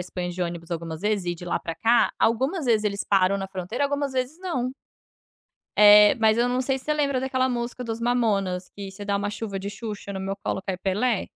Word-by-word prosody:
Espanha 180 0 -5
de 180 +1 -3
ônibus 170 0 -5
algumas 165 -1 -4
vezes 205 -2 0
e 175 0 -1
de 175 +1 -10
lá - - 0
para 165 - -5
cá, 230 +8 +3
algumas 265 - +1
vezes 220 -3 +3
eles 200 -1 -1
param 195 0 +2
na 195 -1 -5
fronteira, 190 +8 -4
algumas 285 -1 -1
vezes 260 +5 -2
não. 260 -10 -2 1.1
É, 210 +2 +8
mas 220 0 +3
eu 245 +1 +2
não 250 +1 0
sei 265 +1 0
se 255 - -17
você 305 - 0
lembra 280 -3 +1
daquela 260 0 0
música 245 0 -3
dos 225 -1 -4
mamonas, 205 -7 0
que 200 -1 -8
se 200 +1 -9
dar 200 0 0
uma 200 +1 -1
chuva 205 -2 -5
de 200 - -5
Xuxa, 205 -1 -7
no 190 - -5
meu 195 +1 -3
colo, 200 -1 -3
cai 190 -1 -3
Pelé. 200 +4 0
210 Hz, 225 wpm, -25 LUFS, 190-250 Hz, 1.1 s, É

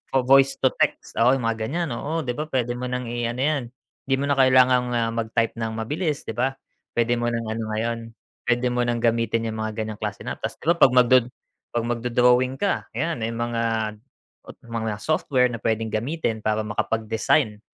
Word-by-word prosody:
o 130 - +4
voice 135 +1 +5
to 130 - +5
text, - - 0
oo 125 +3 +5
'yong 130 - -3
mga 115 -1 -1
ganyan, 170 +1 -2
oo 155 +7 -3
'di 125 - -2
ba, 150 +5 -4
pwede 125 -3 0
mo 125 +1 -4
ng 125 0 -3
i-ano 120 +1 -2
yan, 150 -2 +1 0.4
hindi 135 - +3
mo 140 - -1
na 140 - +3
kailangan 130 -1 +6
ah, 115 -1 +1
magtype 115 0 -1
ng 110 -1 -2
mabilis, 150 +7 -2
'di - - -5
ba. 130 +4 0 0.4
Pwede 120 0 +2
mo 120 - 0
ng 115 -1 -2
ano 115 +1 -3
ngayon 115 +1 -1 0.5
pwede 120 +1 +2
mo 125 0 0
nang 120 -1 -1
gamitin 115 0 +1
'yong 110 - -6
mga 110 0 -2
ganyang 110 -1 -7
klase - - -4
na - - -3
app, - - -38
'tas - - -3
'di - - -16
ba, - - +3
pag 130 - +6
mag 125 -1 +6
do 130 - +9 0.6
pag 120 - +1
mag-do-drawing 125 +2 +2
ka, 200 +4 -1
ayan 160 +2 -1
may 110 - -1
mga 115 -2 -1 0.8
mga 110 -1 -2
software 130 -5 +2
na 115 - -5
pwedeng 110 0 -1
gamitin 115 0 -2
para 110 0 0
makapag-design 110 0 0
120 Hz, 205 wpm, -24 LUFS, 115-130 Hz, 0.8 s, do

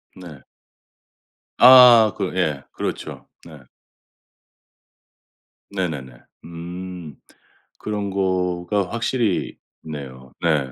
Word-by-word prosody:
네. 85 -7 -12 1.2
아 125 -4 +8
그 95 -3 -4
예. 75 -6 -1
그렇죠. - - -6 0.2
네. 80 -3 -13 2.1
네네네. 75 -11 -5 0.3
음. 85 -1 -9 0.6
그런 105 -1 -4
거가 95 0 -1
확실히 115 -3 -2 0.3
있네요. 65 -4 -9
네. 75 -6 0
90 Hz, 130 characters per minute, -21 LUFS, 75-100 Hz, 2.1 s, 아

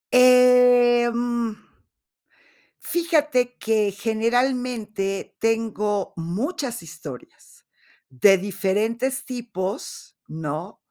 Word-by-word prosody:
Em, 245 -2 +4 1.3
fíjate 300 -8 0
que 215 -2 0
generalmente, 225 -2 -2
tengo 215 -3 -1
muchas 245 - -4
historias 155 -5 -12 0.5
de 195 +10 +5
diferentes 210 +7 -2
tipos, 225 -3 -6
¿no? 160 +4 -6
225 Hz, 60 wpm, -23 LUFS, 195-250 Hz, 1.3 s, de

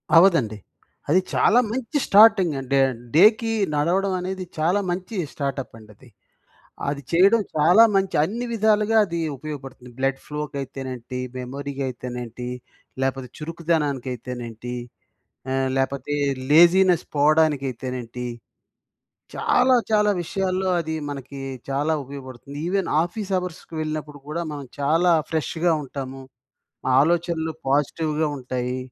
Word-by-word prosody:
అవ్వదండి. 165 - +5 0.5
అది 180 +5 +5
చాలా 235 +3 +4
మంచి 260 +3 -2
స్టార్టింగ్ 200 -5 +6
అంటే 135 +1 +1 0.4
డేకి 220 +5 +5 0.2
నడవడం 185 +6 +1
అనేది, 185 +1 -4
చాలా 175 +6 +2
మంచి 185 +4 -4 0.2
స్టార్టప్ 140 -3 -4
అండది. 110 +3 -17 0.8
అది 140 0 -3
చేయడం 195 +6 +5
చాలా 175 +9 +6
మంచి, 195 -1 +1
అన్ని 235 +8 -2
విధాలుగా 215 0 +3
అది 170 -2 -4 0.2
ఉపయోగపడుతుంది. 135 -4 -8
బ్లడ్ 135 0 0
ఫ్లో 150 0 -4
కయితేనేంటి 130 -2 -5 0.2
మెమరీ 140 +3 -5
కయితేనేంటి 125 -1 -5 0.6
లేపోతే, 135 -1 -2
చురుకుదనాకైతేనేంటి 130 -7 -3 0.8
ఆహ్, 135 0 +1
లేపోతే, 140 +2 -1 0.4
లేజీనెస్ 175 +2 +6
పోవడానికైతేనేంటి, 135 -5 +1 1.1
చాలా, 255 0 +3 0.2
చాలా 210 -1 +4
విషయాల్లో 190 +1 -1
అది 160 -1 -3
మనకి 140 0 -7 0.3
చాలా 145 +4 +1
ఉపయోగపడుతుంది. 135 0 -9
ఇవెన్ 195 0 0
ఆఫీస్ 195 +3 -5
అవర్స్‌కి 180 -2 -6
వెళ్ళినప్పుడు 155 -2 -5
కూడా, 165 +3 -3
మనం 145 -2 -6
చాలా 165 +5 +3 0.2
ఫ్రెష్‌గ 160 +2 -2 0.2
ఉంటాము. 135 0 -7 0.8
ఆలోచనలు 165 0 +1
పాజిటివ్‌గ 150 +2 0 0.2
ఉంటాయి. 125 0 -3
150 Hz, 105 wpm, -23 LUFS, 135-180 Hz, 1.1 s, స్టార్టింగ్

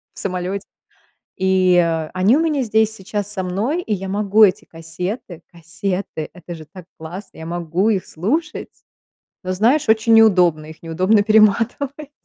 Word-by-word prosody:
в - - -8
самолете, 185 +1 -3 0.7
и 185 -1 +3 0.4
они 195 +9 +3
у - - +1
меня 310 -4 0
здесь 220 -1 +1
сейчас 205 0 -4
со 190 -3 -3
мной, 220 - -2
и 215 - -3
я 195 0 -4
могу 210 +2 +3
эти 205 +3 -1
кассеты 175 +3 -7
кассеты! 170 0 -5
Это 175 -1 -9
же 160 -1 -11
так 185 +1 -13
классно, 175 +5 -10
я 160 - -8
могу 175 +4 -1
их 195 -4 0
слушать, 300 - -3 0.8
но 185 - -2
знаешь, 230 +10 +2
очень 225 +1 +3
неудобно, 180 -8 +4
их 160 +1 -13
неудобно 185 +6 +2
перематывать. 230 +7 +1
195 Hz, 150 wpm, -19 LUFS, 180-220 Hz, 0.8 s, неудобно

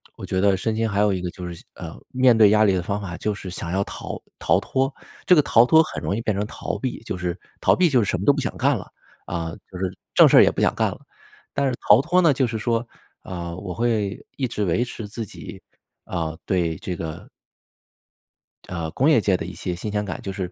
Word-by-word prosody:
我 - - -11
觉 95 - -1
得 100 0 +4
身 110 +4 -2
心 115 0 0
还 100 -1 -1
有 105 -1 +4
一 90 -2 -2
个 90 - -2
就 90 -2 -7
是 85 -1 -9
呃， 85 -3 -9
面 130 -3 +4
对 105 -2 +7
压 110 0 +5
力 100 - +4
的 90 -2 -1
方 100 +2 -2
法 85 -3 -6
就 105 - -1
是 95 -2 -8
想 85 -1 -5
要 95 +2 +1
逃 - - -7 0.2
逃 - - +2
脱。 135 +1 -1 0.3
这 180 - +6
个 150 - +6
逃 120 -4 +5
脱 160 +4 +6
很 155 - -4
容 100 - -1
易 115 - -2
变 110 -3 -1
成 105 - 0
逃 105 - -5
避， 125 +4 -4
就 100 - -5
是 90 -1 -2 0.3
逃 - - +4
避 180 -2 +3
就 125 -5 +3
是 - - -3
什 90 - -1
么 100 - -4
都 - - +9
不 145 - -3
想 - - -3
干 - - +2
了， - - -9 0.4
啊， 85 -2 -3 0.2
就 90 - -8
是 95 -1 -3 0.2
正 - - +7
事 - - +8
也 - - +4
不 - - -3
想 - - +2
干 - - +1
了。 - - -9 0.5
但 140 -1 0
是 130 - 0 0.2
逃 - - +9
脱 175 +6 +2
呢， 165 -4 +5
就 130 -1 +1
是 115 -2 -3
说 115 +1 -1 0.3
啊， 85 -2 -6
我 95 -1 -6
会 110 -2 -1
一 130 -2 0
直 105 -3 -2
维 90 +8 +1
持 110 -3 -7
自 110 +2 -5
己 - - -10 0.5
啊， 80 -2 -3
对 85 -4 0
这 90 - -5
个 80 -1 -6 1.4
呃， 85 -3 -4
工 140 +5 +2
业 150 - +5
界 95 -2 +2
的 - - -5
一 90 - -7
些 90 -2 -4
新 105 +4 -5
鲜 105 0 -1
感 90 - -5
就 95 - -5
是 95 -2 -4
100 Hz, 270 characters per minute, -23 LUFS, 90-120 Hz, 1.4 s, 都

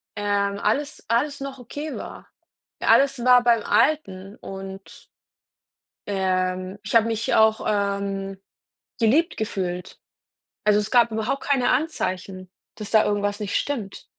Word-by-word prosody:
ähm, 200 -1 0
alles 280 +9 -1
alles 275 +6 0
noch 275 -1 -6
okay 290 +6 -6
war - - -9 0.5
alles 275 -1 +4
war 250 -1 +6
beim 235 -3 +3
Alten 195 -10 +1
und 195 0 -9 1.0
ähm, 185 -1 -1
ich 210 - -5
habe 230 0 +5
mich 225 0 -1
auch, 220 0 +4
ähm, 200 -1 -2 0.6
geliebt 285 +10 +3
gefühlt. 185 -5 -4 0.7
Also, 210 0 +4
es 210 - -3
gab 235 -2 +5
überhaupt 220 +5 -2
keine 265 -3 +2
Anzeichen, 185 - -2 0.3
dass 210 -1 -7
da 220 -1 +5
irgendwas 205 0 -1
nicht 205 -2 -3
stimmt. 230 -9 -3
210 Hz, 125 wpm, -23 LUFS, 195-245 Hz, 1.0 s, war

